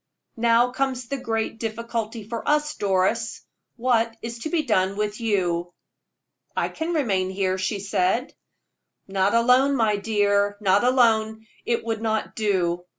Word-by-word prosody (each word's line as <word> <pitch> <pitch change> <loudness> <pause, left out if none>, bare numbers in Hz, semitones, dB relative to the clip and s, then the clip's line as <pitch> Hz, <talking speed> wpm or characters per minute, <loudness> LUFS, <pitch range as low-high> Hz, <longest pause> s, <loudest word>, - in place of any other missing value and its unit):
Now 235 +1 +3
comes 255 -2 -2
the 275 - -2
great 225 -3 -3
difficulty 230 0 -4
of 220 - -11
all, 295 +6 +2 0.2
Doris 200 +4 0 0.3
what 230 -2 +1
is 235 0 -5
to 315 - -4
be 330 -2 +1
done 195 -6 +1
with 210 +1 -2
you?" 175 -6 0 0.9
"I - - +1
can 330 +2 -3
remain 195 -11 +1
here," 190 -1 -1
she 195 +2 -1
said. 195 +5 0 0.7
"Not 195 +2 +1
alone, 250 +4 +4
my 220 -4 +2
dear, 205 -1 +1
not 200 0 +3
alone 220 -3 +2 0.2
it 235 -1 0
would 225 -1 -2
not 220 -1 -2
do. 180 -5 0
220 Hz, 145 wpm, -24 LUFS, 200-235 Hz, 0.9 s, alone